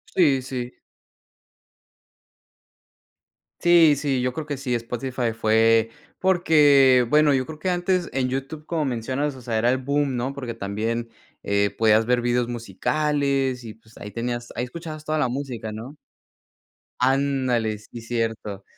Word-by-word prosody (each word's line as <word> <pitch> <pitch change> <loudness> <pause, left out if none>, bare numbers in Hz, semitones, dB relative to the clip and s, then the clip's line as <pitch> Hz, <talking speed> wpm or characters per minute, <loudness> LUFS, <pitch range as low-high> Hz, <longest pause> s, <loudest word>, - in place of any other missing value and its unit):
Sí, 145 -7 +4
sí. 125 -1 -6 2.8
Sí, 170 -4 +6
sí, 135 -3 -1
yo 125 0 -1
creo 155 +1 -5
que 145 -1 -3
sí, 130 -2 -2
Spotify 120 0 -3
fue 115 0 +3 0.3
porque, 145 -9 +5
bueno, 150 -1 +4
yo 130 -1 +1
creo 155 -1 -8
que 180 +4 -1
antes 180 0 0
en 130 -1 0
YouTube, 135 +4 -5
como 160 -3 -1
mencionas, 130 +4 -2
o 130 - -11
sea, 115 -2 -2
era 120 +3 +3
el 130 - 0
boom, 140 0 0
¿no? 125 +3 -2
Porque 125 -4 -5
también, 115 +3 -3 0.3
eh, 100 0 +1
podías 110 0 +4
ver 125 0 +2
videos 120 0 +1
musicales 135 +3 -1
y, 110 -2 -8
pues, 110 0 -22
ahí 105 - -8
tenías 120 +1 -4
ahí 120 - -2
escuchabas 155 +2 -8
toda 155 0 -1
la 145 -4 +2
música, 125 -4 -5
¿no? 120 +7 -8 1.0
Ándale, 130 -4 +1
sí, 105 +3 -11
cierto. 115 -4 -3
125 Hz, 145 wpm, -23 LUFS, 115-145 Hz, 2.8 s, Sí